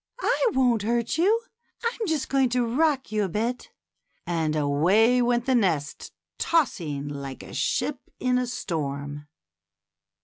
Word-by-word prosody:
I - - +2
won't 245 -4 +3
hurt 235 +6 0
you; 425 +7 +3 0.4
I'm 465 -2 -1
just 310 -5 0
going 270 -2 +2
to 245 0 +1
rock 270 +2 +1
you 215 -1 +1
a 195 - -1
bit;" 235 - -2 0.6
and 160 -3 -1
away 180 +12 +3
went 240 0 +1
the 265 - +2
nest, 170 - 0 0.3
tossing 165 - 0
like 140 -2 -6
a - - -11
ship 290 -3 -1 0.2
in 250 0 +2
a 250 - -1
storm. 145 - -4
235 Hz, 140 wpm, -26 LUFS, 155-260 Hz, 0.6 s, won't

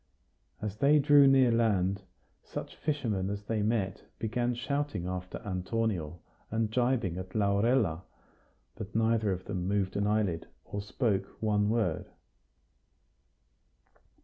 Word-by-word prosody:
As 105 -1 -3
they 140 +6 +5
drew 145 -1 +6
near 135 -2 +5
land, 100 -4 +2 0.4
such - - -7
fishermen 110 -11 -1
as 100 0 -4
they 110 0 -1
met 105 -3 0 0.2
began 120 +2 -1
shouting 135 -6 -2
after 90 0 -4
Antonio 90 -4 -2 0.3
and 110 0 -1
gibing 120 -7 +1
at 95 +2 -8
Laurella; 100 -3 +2 0.7
but 105 -1 -8
neither 110 -2 +2
of 95 0 -4
them 90 -3 -3
moved 100 -1 0
an 100 0 +1
eyelid, 105 -6 0 0.2
or 100 - -4
spoke 105 -1 0
one 105 -1 +1
word. 110 -8 0
105 Hz, 120 wpm, -30 LUFS, 95-115 Hz, 0.7 s, drew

